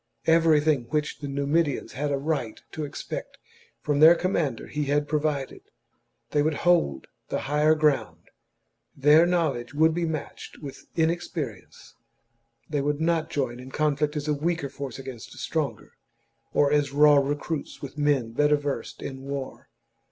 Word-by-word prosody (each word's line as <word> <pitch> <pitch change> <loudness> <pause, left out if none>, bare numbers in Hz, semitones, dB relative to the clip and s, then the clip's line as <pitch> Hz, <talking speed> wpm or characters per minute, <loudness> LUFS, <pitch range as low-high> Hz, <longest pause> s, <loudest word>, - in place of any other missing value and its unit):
Everything 155 -5 +4
which 150 +4 -2
the 145 - -5
Numidians 140 +1 0
had 145 +1 -2
a 140 - +1
right 140 -6 -2
to 155 - -4
expect 145 - -6 0.4
from 145 -1 0
their 160 +3 +9
com 185 +2 -1
mander 145 - -1
he 150 -1 -3
had 145 +1 +1
provided; 150 -3 -1 0.7
they 145 - +2
would 155 +1 +1
hold 170 - +3 0.2
the - - -2
higher 150 +3 +3
ground, 150 -2 0 0.7
their 150 +5 +6
knowledge 145 -8 -1
would 160 +2 +4
be 170 0 -1
matched 155 -3 -6
with 140 -3 -10
inex 170 +1 0
perience, 130 - -7 0.7
they 145 -2 -1
would 145 +1 -1
not 165 0 +1
join 130 -7 -2
in 130 +1 -9
conflict 150 +1 0
as 150 0 -3
a 150 - +2
weaker 160 0 -1
force 135 -2 -6
against 130 -4 -9
a - - -16
stronger, 140 -9 -3 0.6
or 145 -1 +3
as 145 -2 +2
raw 145 +1 +6
recruits 145 +2 -2
with 140 - -7
men 145 -6 +1
better 150 +5 +3
versed 145 -1 -4
in 135 -1 -6
war. 135 -1 -6
145 Hz, 160 wpm, -26 LUFS, 140-155 Hz, 0.7 s, their